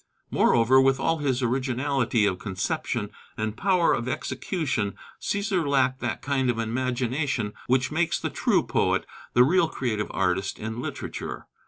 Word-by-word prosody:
Moreover, 120 +3 +5
with 135 0 +3
all 165 +4 +1
his 135 -3 0
originality 130 -1 +1
of 95 -3 0
conception 95 -2 -2 0.3
and 110 0 -2
power 185 - +3
of 115 - -2
execution, 130 - -2 0.3
Cæsar 200 -3 0
lacked 130 -2 +2
that - - -3
kind 135 -2 +1
of 120 - 0
imagination 125 0 -1
which 130 +2 +2
makes 165 +2 +1
the - - -3
true - - +2
poet, - - +1 0.3
the 125 - +7
real 170 +5 +4
creative 110 -8 -2
artist 95 +1 0
in 110 +2 -5
literature. - - -5
130 Hz, 145 wpm, -26 LUFS, 115-140 Hz, 0.3 s, the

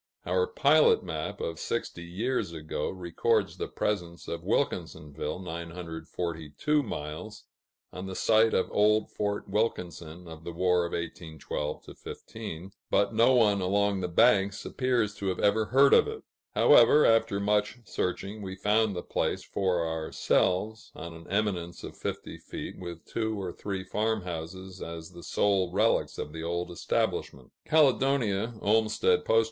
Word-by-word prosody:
Our 460 -1 +1
pilot 465 -1 +4
map, - - -4
of 470 +1 -4
sixty 105 -7 -3
years 95 +2 -2
ago, 80 -1 -3
records 95 +4 0
the - - -3
presence 90 -5 -3
of 85 0 -4
Wilkinsonville 85 - -2
(942 85 - -3
miles), 105 - -6 0.5
on 90 +1 -6
the 95 - -6
site 110 +2 +4
of 95 - +1
old 105 +1 +3
Fort 105 0 -2
Wilkinson 90 -6 -2
of 80 -1 -10
the 85 - -6
War 90 0 +2
of - - -9
1812 80 -3 -4
15, 95 -5 -8 0.2
but 100 +2 +2
no 115 +4 +5
one 105 -5 +4
along 100 +1 +1
the 90 - -1
banks 100 +2 +3
appears 125 -5 0
to 100 - -3
have 95 - 0
ever 105 +2 +3
heard 135 +4 +5
of - - +6
it; 440 0 -6 0.3
however, 150 - +7
after 115 -3 +3
much 105 +3 +1
searching, 95 +3 -3
we 95 -1 -5
found 105 +1 +2
the 85 - -4
place - - -1
for 90 -4 0
ourselves, 90 +6 0
on 85 - -7
an 85 0 -12
eminence 95 -4 -1
of - - -8
fifty - - -5
feet, - - -7
with 85 -2 -8
two 110 -2 -2
or 90 -3 -4
three 95 -2 -4
farm 110 +2 -1
houses 90 +2 -7
as 85 0 -7
the 85 - -11
sole 95 -1 +1
relics - - +2
of 75 - -5
the 80 - -6
old 85 +1 -2
establishment. 85 - -2 0.2
Caledonia 130 -7 +3
(Olmstead 110 - +2
P.O.) 115 - +5
95 Hz, 150 wpm, -29 LUFS, 85-110 Hz, 0.5 s, however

